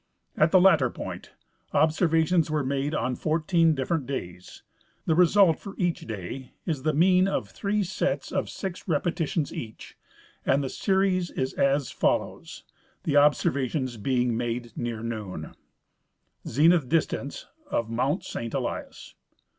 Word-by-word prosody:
At 155 - +4
the 185 - +6
latter 165 -9 +5
point - - -7 0.4
observations 160 +1 +3
Avere 150 -3 0
made 140 +3 -1
on 125 +2 -1
fourteen 165 +1 +2
different 135 +1 -1
days. 90 -9 -7 0.4
The 160 - +2
result 180 +1 +5
for 200 -1 -9
each 175 - -1
day 110 +5 -6
is 155 -6 -2
the 155 +2 0
mean 185 +3 +4
of 195 - -2
three 205 0 -1
sets 190 +1 -2
of - - -1
six 190 -1 -6
repetitions 165 -1 -1
each, 110 -2 -8 0.5
and 140 +2 +2
the 135 - -3
series 190 -3 +1
is 130 0 -3
as 140 -1 +1
foUoAvs, - - -1 0.4
the 145 - 0
observations 135 -3 +2
being 125 +1 0
made 120 0 -3
near 115 -2 -4
noon: 105 -9 -5 0.9
ZENITH 155 -2 +3
DISTANCE 155 -3 -1 0.2
OF 115 -1 -1
MOUNT 130 - 0
SAINT 115 -1 -5
ELIAS. - - -5
150 Hz, 135 wpm, -26 LUFS, 125-170 Hz, 0.9 s, the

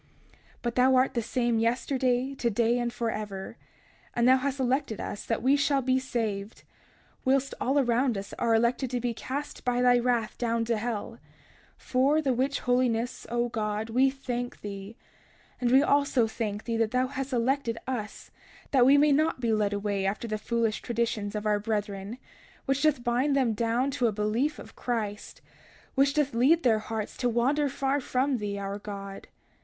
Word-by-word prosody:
31:17 - - -27 0.3
But 240 -1 -1
thou 260 +1 +5
art 255 +1 +3
the 235 - 0
same 235 0 0
yesterday, 250 +2 0
today, 235 -1 +1
and 240 0 -1
forever; 215 -5 -4 0.6
and 240 0 +3
thou 260 +1 +7
hast 275 +1 -2
elected 260 -3 0
us 205 - -5
that 230 - -2
we 270 +2 +5
shall 280 -1 +1
be 260 +1 +2
saved, 220 -5 -3 0.6
whilst 270 +1 +1
all 270 +3 +1
around 245 -3 +2
us 195 0 -7
are 230 -1 +3
elected 240 +3 +1
to 250 0 -1
be 240 0 -1
cast 280 +5 -5
by 245 0 0
thy 245 0 +5
wrath 240 -3 0
down 230 -1 0
to 230 -1 0
hell; 230 0 -4 0.6
for 270 +4 +2
the 275 -4 +1
which 270 +3 0
holiness, 245 -1 0
O 240 0 0
God, 215 0 -3
we 260 +3 +4
thank 245 -2 -5
thee; 200 +1 -7 0.6
and 245 - +1
we 265 +3 +6
also 280 -5 +3
thank 220 -2 -4
thee 230 -1 -2
that 225 -1 +1
thou 255 +2 +1
hast 270 +1 -5
elected 245 -1 0
us, 240 -5 -5 0.4
that 255 -3 +5
we 280 +2 +7
may 295 +1 +5
not 310 +1 +2
be 230 -2 +1
led 210 -2 +1
away 200 -1 -1
after 210 +4 -2
the 215 -1 -3
foolish 230 -1 -1
traditions 225 -3 -2
of 210 0 -3
our 210 -1 +2
brethren, 205 0 -3 0.5
which 270 0 0
doth 300 -5 +2
bind 250 +4 +1
them 255 -5 +2
down 235 +5 0
to 250 -2 +1
a - - +1
belief 220 +8 0
of - - -12
Christ, 215 -4 -4 0.5
which 275 +1 +2
doth 295 -2 +1
lead 280 +9 +4
their 225 -3 +4
hearts 215 -1 -5
to 245 - +1
wander 275 +5 +1
far 275 +1 0
from 260 +1 0
thee, 205 -1 -3
our 200 0 -4
God. 200 -1 -8
240 Hz, 180 wpm, -28 LUFS, 220-265 Hz, 0.6 s, thou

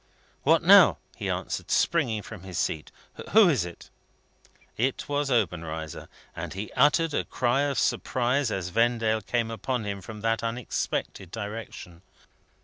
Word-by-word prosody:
"What - - +3
now?" - - +8 0.2
he - - -4
answered, - - -3
springing 120 -11 +1
from 110 -5 -9
his 95 -2 -7
seat; 75 - -2 0.4
"who 220 -2 +8
is 130 - +1
it?" 85 - -11 0.8
It 130 +3 -1
was 145 0 -1
Obenreizer, 80 - -2 0.3
and - - -6
he 100 +2 -5
uttered 150 +4 +3
a - - 0
cry 125 +2 0
of 140 - -3
surprise 130 +1 +1
as 95 -4 -3
Vendale 115 +1 +1
came 115 +2 -1
upon 115 +2 -2
him 100 -1 -4
from 105 +2 -9
that 115 0 0
unexpected 115 -5 -3
direction. 105 -4 -7
115 Hz, 140 wpm, -27 LUFS, 95-125 Hz, 0.8 s, now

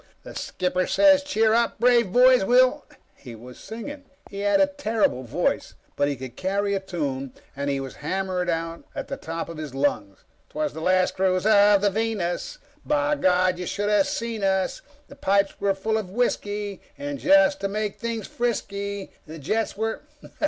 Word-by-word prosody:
The - - -10
Skipper 180 0 -2
says 290 -1 +5
'Cheer 225 -7 +2
up, 235 -1 +1
brave 235 -4 +4
boys, 250 0 +6
we'll 255 +6 +3
'_" - - -19 0.2
He 125 -4 -11
was 125 +3 -12
singing. 280 +6 -8 0.3
He 200 - -6
had 205 +7 +2
a 290 - +6
terrible 230 - 0
voice, 135 +8 -2 0.2
but 145 - +1
he 145 - -1
could 130 -1 -9
carry 200 +2 -1
a 195 - 0
tune, 140 -8 -4 0.2
and 140 +1 -2
he 140 -1 0
was 135 -1 -7
hammering 185 +2 -2
it - - +3
out 165 0 -4
at - - -5
the - - -3
top 165 0 -5
of 165 -1 -8
his 150 -4 -7
lungs. 105 -9 -1 0.3
"Twas 305 -1 -2
the 160 - -7
last 185 +2 +2
cruise 185 0 +1
of 205 -2 +5
the 205 -1 +2
Venus, 220 - -2 0.3
_by 295 0 +1
God 185 -1 +3
you 180 - -4
should 205 0 -2
of 210 +8 +3
seen 235 -7 -3
us! 190 -1 0 0.3
The 280 - -13
pipes 200 -6 +1
were 200 -1 +2
full 220 +3 -1
of 200 -4 -6
whisky, 205 -2 -2 0.2
and 285 0 -5
just 295 0 +4
to 195 - 0
make 210 0 -3
things 230 -2 -4
risky, 200 -4 -2 0.2
the 160 +1 -8
jets 210 +9 -2
were 220 +1 -2
200 Hz, 190 wpm, -24 LUFS, 180-235 Hz, 0.3 s, boys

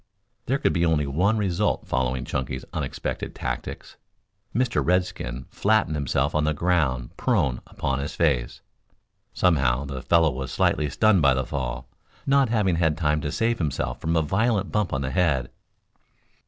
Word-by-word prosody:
There 135 - +2
could - - +1
be 85 - +1
only 80 -3 +2
one 90 +11 +1
result 100 0 0
following 65 -1 -1
Chunky's 65 0 -3
unexpected - - -4
tactics. - - -5 0.5
Mr. 125 -1 +1
Redskin 80 -9 -1
flattened 110 -6 +2
himself 70 +1 0
on 75 - +1
the 75 0 +1
ground 70 -8 0
prone 65 -4 +1
upon 70 0 -2
his 70 +2 -4
face. 70 -8 0 0.7
Somehow 70 -7 +2
the 70 -2 -5
fellow 80 +4 +3
was 65 0 -5
slightly 75 +2 +1
stunned 100 +5 +3
by 70 -2 +4
the 65 -1 -1
fall, 65 0 -4 0.4
not 140 -2 +3
having 105 -7 +1
had 80 -3 +1
time 75 -2 +1
to 75 - -3
save 115 +7 0
himself 75 -6 -2
from 80 +1 0
a 80 - +3
violent 100 +4 0
bump 105 -4 0
on 65 - -1
the 65 -1 -2
head. 80 -9 +1
75 Hz, 160 wpm, -25 LUFS, 65-95 Hz, 0.7 s, by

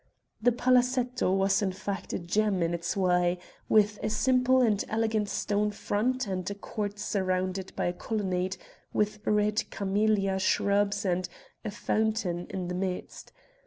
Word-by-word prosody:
The 245 +2 +4
palazetto 250 -2 +2
was 195 +1 +2
in 195 -2 +1
fact 195 0 -5
a - - -1
gem 195 +1 +1
in 165 +1 0
its 170 +2 -2
way, 180 -1 +2 0.3
with 210 -1 +4
a 215 - -1
simple 255 +3 +3
and 220 -5 +3
elegant 220 -1 0
stone 210 +1 0
front 240 +5 -1
and 185 -2 -3
a 200 - -4
court 205 0 -4
surrounded 185 -1 -1
by - - -1
a 175 - 0
colonnade 190 -2 -2 0.4
with 210 0 0
red 210 0 +1
camellia 200 -1 +1
shrubs 200 +1 +1
and 180 0 0 0.3
a 220 - -3
fountain 210 -4 -1
in 185 -2 -4
the 180 - -3
midst. 180 0 -4
205 Hz, 150 wpm, -28 LUFS, 185-215 Hz, 0.4 s, The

